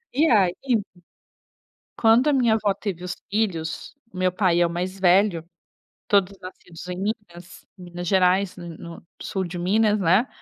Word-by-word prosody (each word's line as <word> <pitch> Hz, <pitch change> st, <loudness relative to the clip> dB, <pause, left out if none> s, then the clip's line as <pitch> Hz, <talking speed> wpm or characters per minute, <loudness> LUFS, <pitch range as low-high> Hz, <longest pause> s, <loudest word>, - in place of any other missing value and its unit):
E 310 Hz, +4 st, +3 dB
aí 190 Hz, -6 st, +4 dB, 1.5 s
quando 230 Hz, +4 st, +4 dB
a 290 Hz, -, +2 dB
minha 235 Hz, -4 st, +3 dB
avó 210 Hz, -2 st, 0 dB
teve 185 Hz, -4 st, -6 dB
os 180 Hz, -, -4 dB
filhos, 190 Hz, -, -3 dB, 0.2 s
meu 185 Hz, 0 st, 0 dB
pai 180 Hz, -2 st, +1 dB
é 175 Hz, -, +4 dB
o -, -, -7 dB
mais 185 Hz, +3 st, -4 dB
velho, 185 Hz, -2 st, +3 dB, 0.6 s
todos 200 Hz, -1 st, +2 dB
nascidos 180 Hz, -2 st, -11 dB
em 180 Hz, 0 st, -5 dB
Minas, 185 Hz, -4 st, -6 dB
Minas 175 Hz, -1 st, -8 dB
Gerais, 190 Hz, +1 st, +2 dB
no 175 Hz, -1 st, -8 dB
no 170 Hz, 0 st, -11 dB
sul 190 Hz, -, -3 dB
de 175 Hz, 0 st, -6 dB
Minas, 210 Hz, +3 st, +2 dB
né. 190 Hz, +8 st, +3 dB
185 Hz, 155 wpm, -23 LUFS, 175-210 Hz, 1.5 s, aí